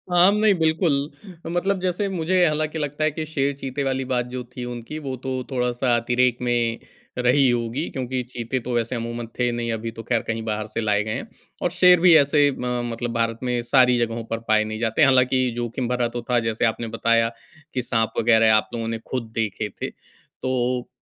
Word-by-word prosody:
आम 185 +4 +6
नहीं, 215 -1 +4
बिल्कुल। 160 0 +2 0.6
मतलब 185 +2 0
जैसे 185 +2 -1
मुझे 180 0 +2
हालाँकि 155 0 0
लगता 145 +1 -2
है 155 - +2
कि 155 +1 -4
शेर 140 -2 -1
चीते 135 0 -4
वाली 135 -1 -1
बात 125 -2 0
जो 125 0 -5
थी 125 - -5
उनकी 120 +5 -6
वो 135 -3 -4
तो 130 -1 -2
थोड़ा-सा 125 -1 +1
अतिरेक 120 +1 +2
में 120 -2 0 0.4
रही 125 +2 +4
होगी 120 +5 -1
क्योंकि 130 -1 -3
चीते 120 +2 -3
तो 125 0 -5
वैसे 120 +1 -1
अमूमन 115 0 -4
थे 120 0 +2
नहीं, 120 0 -2
अभी 115 +1 -4
तो 115 0 -9
खैर 115 -1 0
कहीं 115 0 -2
बाहर 110 -1 -2
से 110 +2 -3
लाए 105 -1 +1
गए 110 0 -3
हैं। - - -5 0.3
और - - 0
शेर 180 -1 +6
भी 175 -1 +7
ऐसे 145 0 +4
अ, - - -3 0.4
मतलब 115 0 -3
भारत 115 -1 -1
में 125 -1 0
सारी 125 0 +4
जगहों 115 -1 -1
पर 115 0 -3
पाए 110 0 +4
नहीं 110 0 -5
जाते। 115 +5 +2
हालाँकि 130 -2 +4
जोखिम 120 +1 -3
भरा 125 -1 0
तो 120 - -2
था 125 - +3
जैसे 115 +2 0
आपने 115 0 -1
बताया 115 0 +3 0.4
कि 125 - 0
साँप 115 -2 -1
वग़ैरह 110 -1 +5
आप 110 - +1
लोगों 115 -1 -3
ने 115 0 -3
खुद 115 -4 -3
देखे 105 -1 -2
थे। - - -2 0.5
तो 125 -1 -1
125 Hz, 205 wpm, -23 LUFS, 115-140 Hz, 0.6 s, भी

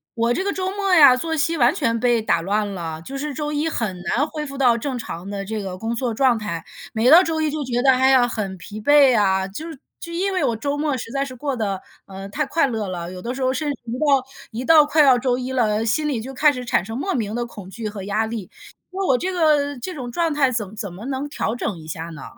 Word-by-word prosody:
我 235 +1 +1
这 375 - -1
个 400 - 0
周 375 0 -2
末 395 -1 -1
呀 285 -7 +8
作 320 +5 -2
息 320 +2 +1
完 250 0 +4
全 230 -10 0
被 240 -1 +2
打 215 - +1
乱 205 +4 0
了， 165 -3 -5
就 270 +9 -8
是 295 +2 -3
周 295 +2 -3
一 300 +2 0
很 215 -10 -2
难 250 +10 0
恢 305 -1 -5
复 275 -1 -8
到 245 -4 +4
正 260 +2 -3
常 190 -5 -7
的 200 -1 -4
这 215 +1 -3
个 190 -2 -6
工 225 +4 -3
作 245 0 -1
状 250 0 +3
态。 205 -7 -4 0.3
每 230 +3 +3
到 335 +3 +10
周 325 -2 -1
一 310 - +1
就 305 -1 -3
觉 245 -2 -1
得， 265 - +6
哎 260 +1 +4
呀， 255 -2 +5
很 205 -5 -4
疲 205 +4 -9
惫 280 0 +6
啊， 190 -2 +2
就 310 +13 -7
是 275 - -11 0.2
就 335 - -8
因 380 +3 -1
为 370 - 0
我 230 - +1
周 280 +6 -2
末 295 -2 0
实 230 -1 -7
在 275 +1 0
是 265 -2 -7
过 275 +2 -3
得， 200 -5 -2 0.3
呃， 195 0 -8
太 300 +9 -1
快 320 +3 +1
乐 220 -5 -3
了， 175 -1 -5
有 185 0 -8
的 240 +4 -4
时 270 - -6
候 260 0 +2
甚 290 +2 -1
至 280 - -6
一 230 - -6
到 280 -4 +3 0.3
一 240 +3 -5
到 315 0 +7
快 300 +1 +4
要 265 -3 +6
周 250 -1 0
一 255 0 -4
了， 220 -4 +1
心 300 +7 +1
里 260 -5 -1
就 265 +4 -8
开 300 +3 +4
始 250 -3 -6
产 235 - +1
生 225 +4 -6
莫 380 +8 -2
名 220 -3 -2
的 240 0 -1
恐 205 -5 -10
惧 215 +3 -6
和 205 -1 -6
压 205 +3 0
力。 220 -5 -6 0.4
那 385 +1 -2
我 260 - +4
这 370 +8 -2
个 300 -5 +2
这 365 +9 -5
种 255 -6 -6
状 330 +4 0
态 275 -3 +2
怎 215 -4 -3
怎 205 -3 -5
么 195 +6 -9
能 270 +1 -3
调 235 -5 -2
整 215 -5 -3
一 155 - -12
下 160 +1 -5
呢？ 155 -5 -9
250 Hz, 295 characters per minute, -22 LUFS, 215-290 Hz, 0.4 s, 到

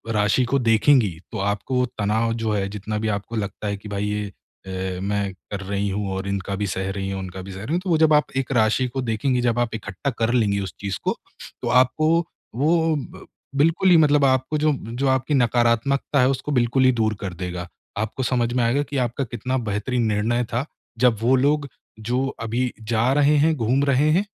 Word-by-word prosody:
राशि 105 +4 +3
को 140 - +3
देखेंगी, 115 - +3
तो 110 - -5
आपको 105 +6 0
तनाव 110 +2 +1
जो 115 -1 -2
है 100 -2 0
जितना 105 +1 -4
भी 110 - -2
आपको 100 +3 -6
लगता 105 0 -4
है 100 0 -2
कि 105 +2 -11
भाई 100 0 -2
ये 105 0 -2 0.4
अ, 95 -1 -4
मैं 100 0 -1 0.2
कर 100 - -3
रही 100 +1 -1
हूँ 100 0 -2
और 95 +1 -4
इनका 100 0 -2
भी 105 +1 -2
सह 95 0 -2
रही 95 0 -4
हूँ, 95 - -3
उनका 95 0 -7
भी 95 - -9
सह 95 +1 -8
रही 145 +9 -3
हूँ। 175 - +2
तो 190 - -4
वो 165 - +4
जब 160 -1 +4
आप 150 0 +3
एक 135 -1 -1
राशि 120 +2 +2
को 130 +2 -4
देखेंगी, 125 +2 0
जब 120 -1 +1
आप 115 -2 -1
इकट्ठा 105 +4 -4
कर 115 +1 +1
लेंगी 105 -5 +2
उस 95 -5 -5
चीज़ 100 -2 -3
को, - - 0 0.5
तो - - -3
आपको 130 +5 +3 0.5
वो 160 +4 +2
ब 145 - -7 0.3
बिल्कुल 165 +6 +3
ही 180 - +7
मतलब 150 -2 +4
आपको 130 +3 +1
जो 155 +1 +2 0.2
जो 135 +2 0
आपकी 130 +3 +1
नकारात्मकता 125 +2 +2
है 125 - +4
उसको 135 +2 -2
बिल्कुल 125 +1 +2
ही 130 - +6
दूर 110 -2 +1
कर 95 -2 -4
देगा, 90 -1 -5 0.3
आपको 110 +5 -2
समझ 120 -2 0
में 125 -1 +1
आएगा 125 +5 +2
कि 145 -1 -5
आपका 120 +3 -3
कितना 125 +2 -3
बेहतरीन 120 +4 -1
निर्णय 110 +3 +1
था, 125 +4 0 0.3
जब 125 -3 +4
वो 125 +3 +4
लोग 145 +2 +2 0.4
जो 130 +2 +1 0.2
अभी 120 +2 -1 0.2
जा 115 +3 +2
रहे 145 +1 +4
हैं, 160 +2 +3
घूम 130 +2 +1
रहे 140 +2 +3
हैं, 190 +6 +2
120 Hz, 215 wpm, -23 LUFS, 100-135 Hz, 0.5 s, ही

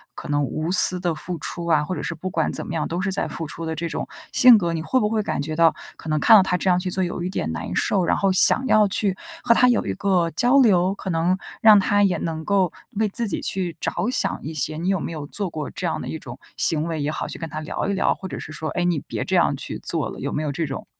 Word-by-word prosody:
可 - - -9
能 145 0 +1
无 155 +5 -3
私 185 -1 +2
的 175 -2 -1
付 170 +2 -5
出 170 - -5
啊， 155 -3 +3
或 185 - -4
者 - - -5
是 170 - -4
不 185 +4 -5
管 - - 0
怎 - - -2
么 170 - -6
样， 155 -2 -2
都 170 +2 -4
是 190 0 -1
在 195 - -2
付 165 - -6
出 165 - -7
的 160 0 -3
这 170 +2 -3
种 - - -4 0.2
性 250 -4 +8
格， 170 -4 -1
你 160 - -3
会 255 +10 0
不 210 - +1
会 220 -1 0
感 - - -3
觉 155 +1 -4
到 165 0 +4 0.2
可 - - -12
能 155 0 +1
看 225 - +6
到 - - +6
她 185 -1 0
这 190 - -4
样 180 0 +3
去 185 - -3
做 185 +1 -1
有 175 0 -4
一 180 - -3
点 80 - -3
难 80 +2 -5
受， 190 -3 +1
然 - - +1
后 195 -1 +1
想 250 +7 +7
要 215 -5 +4
去 195 -1 0 0.3
和 235 -1 +5
她 250 - +4
有 245 - +2
一 - - -2
个 185 -4 0
交 245 - +3
流， 190 -6 +3
可 190 - -7
能 170 +3 +1 0.2
让 215 -2 +7
她 205 +1 +2
也 180 -4 +2
能 160 -1 -4
够 195 -4 +1 0.2
为 215 -1 0
自 230 +3 0
己 - - -1
去 180 -3 -3
着 - - -2
想 255 - -1
一 155 +3 -6
些。 155 +1 -1
你 175 +4 -2
有 195 -2 +1
没 165 - -5
有 150 -3 -6
做 195 +3 -3
过 155 -3 -5
这 185 - -6
样 - - -3
的 - - -7
一 160 - -5
种 120 +1 -10 0.2
行 155 -1 +5
为 160 -2 -3
也 145 +2 -1
好， - - -4
去 - - -6
跟 165 -1 -6
她 155 - -5
聊 155 +4 -4
一 200 - 0
聊， 190 - +1
或 190 - -8
者 - - -7
是 - - -9
说， 155 0 -5
哎， 175 - -2
你 175 -4 +1
别 - - -5
这 - - -2
样 - - +3
去 - - -6
做 - - -2
了， - - -9
有 - - -4
没 155 - -2
有 150 - -2
这 160 +4 -2
种？ 135 -2 -6
175 Hz, 320 characters per minute, -22 LUFS, 160-195 Hz, 0.3 s, 性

